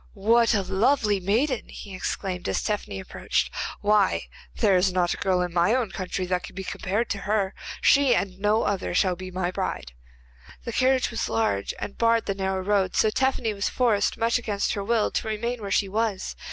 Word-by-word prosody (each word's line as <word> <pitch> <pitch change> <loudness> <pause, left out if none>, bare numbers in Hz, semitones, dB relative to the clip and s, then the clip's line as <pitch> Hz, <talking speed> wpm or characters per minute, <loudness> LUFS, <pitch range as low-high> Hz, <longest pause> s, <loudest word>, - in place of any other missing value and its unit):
'What 230 +3 +3
a 200 - +1
lovely 210 +2 +2
maiden!' 230 +8 0
he 200 - -9
exclaimed, 185 0 -3
as - - -1
Tephany 205 - -3
approached. - - -2 0.3
'Why, 205 -1 +3 0.3
there 205 -4 +3
is 185 +1 +3
not 180 -1 +1
a - - -6
girl 185 -2 +1
in 175 -1 -4
my 175 +7 +3
own 240 -6 -1
country 185 0 -3
that 180 0 -1
can - - -10
be 190 - -5
compared 205 +5 -2
to 200 - -2
her. 200 -1 0 0.3
She, 280 -2 +5
and 190 -1 -2
no 210 +2 +2
other, 195 -3 -1
shall 185 -1 +2
be 185 +1 -8
my 180 -1 -2
bride.' - - -4 0.7
The 235 - -5
carriage 260 0 +2
was 230 - -2
large 160 - 0
and 200 - -7
barred 230 0 +3
the 195 - -1
narrow 190 -1 -2
road, 195 -2 +1
so 215 - +3
Tephany 255 -2 0
was 200 0 -1
forced, 220 -5 +1
much 230 +2 +2
against 210 -4 -1
her 200 - -3
will, 225 0 +1
to - - -2
remain 230 +2 -2
where 200 - -5
she 195 +1 +2
was. 210 -1 -2
205 Hz, 200 wpm, -25 LUFS, 185-230 Hz, 0.7 s, She